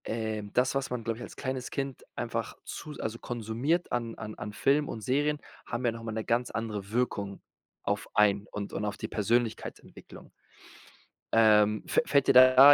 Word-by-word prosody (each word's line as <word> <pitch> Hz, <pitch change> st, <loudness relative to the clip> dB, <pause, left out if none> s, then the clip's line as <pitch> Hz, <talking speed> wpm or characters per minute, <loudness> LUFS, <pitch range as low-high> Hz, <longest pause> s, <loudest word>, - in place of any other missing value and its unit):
Ähm, 110 Hz, -2 st, -3 dB
das, 125 Hz, +1 st, +3 dB
was 135 Hz, -1 st, 0 dB
man, 125 Hz, -2 st, -3 dB
glaube 115 Hz, 0 st, -2 dB
ich, 120 Hz, -, -7 dB
als -, -, -9 dB
kleines 130 Hz, -2 st, -3 dB
Kind 135 Hz, -2 st, -4 dB
einfach -, -, -3 dB
zu 150 Hz, -, -7 dB
s 150 Hz, -, -9 dB
also 110 Hz, +1 st, -3 dB
konsumiert 120 Hz, +9 st, -1 dB
an 115 Hz, -2 st, -2 dB
an 110 Hz, 0 st, -7 dB
an 105 Hz, -, -6 dB
Film 140 Hz, +7 st, +2 dB
und 110 Hz, -, -5 dB
Serien, 145 Hz, +6 st, +1 dB, 0.3 s
haben 125 Hz, -, -3 dB
ja 120 Hz, -, +3 dB
noch 115 Hz, 0 st, -8 dB
mal 115 Hz, -, -4 dB
'ne 110 Hz, 0 st, -2 dB
ganz 120 Hz, +1 st, +1 dB
andere 105 Hz, -3 st, -4 dB
Wirkung 105 Hz, -5 st, -1 dB, 0.4 s
auf -, -, -1 dB
einen, 105 Hz, -1 st, +4 dB
und 100 Hz, -1 st, -5 dB
und 105 Hz, -, -2 dB
auf 105 Hz, -, -3 dB
die 110 Hz, -, -4 dB
Persönlichkeitsentwicklung. 115 Hz, +2 st, -2 dB, 1.0 s
Ähm, 105 Hz, -1 st, +5 dB
fä -, -, +3 dB
fällt 140 Hz, -, +3 dB
dir -, -, +6 dB
da 130 Hz, +2 st, +10 dB
115 Hz, 190 wpm, -29 LUFS, 105-130 Hz, 1.0 s, da